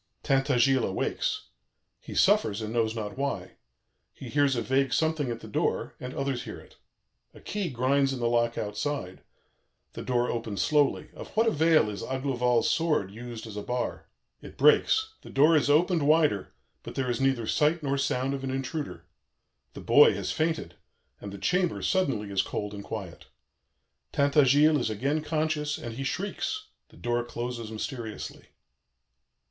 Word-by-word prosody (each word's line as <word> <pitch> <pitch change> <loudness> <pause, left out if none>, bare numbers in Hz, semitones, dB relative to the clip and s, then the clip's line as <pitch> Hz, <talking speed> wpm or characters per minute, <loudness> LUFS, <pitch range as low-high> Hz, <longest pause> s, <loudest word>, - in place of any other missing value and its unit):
"Tintagiles 135 -2 +3
awakes. 95 - -2 0.5
He - - -9
suffers 100 -2 +3
and 110 0 -4
knows 115 -1 +1
not 105 +2 -5
why. 140 0 -3 0.5
He - - -10
hears 145 -2 +2
a 120 - -1
vague 130 +1 +1
something 160 -1 +1
at 115 -1 -4
the - - -9
door, - - -1
and 125 +1 -7
others 135 -3 -2
hear - - -7
it. - - -18 0.6
A - - -12
key 205 -4 -3
grinds 135 +2 +2
in 135 - -4
the 120 - +1
lock 120 0 +1
outside. 105 -2 -3 0.7
The - - -6
door 125 -1 0
opens 115 -4 -4
slowly. 145 -1 +1
Of - - -9
what 225 - +5
avail 160 - +4
is 105 -2 -5
Aglovale's 125 -3 0
sword 150 - +1
used 115 +1 -8
as 110 -2 -9
a 105 - -3
bar? 125 +3 -3 0.3
It - - -12
breaks. 440 0 +4
The - - -12
door 150 +4 +5
is 145 -2 +2
opened 160 0 +3
wider, 150 - +3 0.3
but - - -9
there 130 -2 0
is 120 - -2
neither 135 -4 +1
sight 155 +6 +1
nor 140 -1 0
sound 135 -1 0
of 135 -1 -4
an 135 - -2
intruder. 135 - -4 0.7
The - - -7
boy - - +6
has - - -3
fainted, 160 - -1 0.5
and 100 - -7
the 100 - -7
chamber 180 - 0
suddenly 125 - 0
is 95 -1 +2
cold 105 0 -4
and 100 -1 -7
quiet. 100 -7 -7 0.8
Tintagiles 145 +1 +4
is 120 - -1
again 140 +8 -1
conscious 155 -1 -1
and 115 - -6
he 135 +4 -5
shrieks. 205 - -3 0.2
The - - -18
door 120 0 -1
closes 120 -1 -5
mysteriously. 110 0 -6
130 Hz, 165 wpm, -28 LUFS, 115-150 Hz, 0.8 s, boy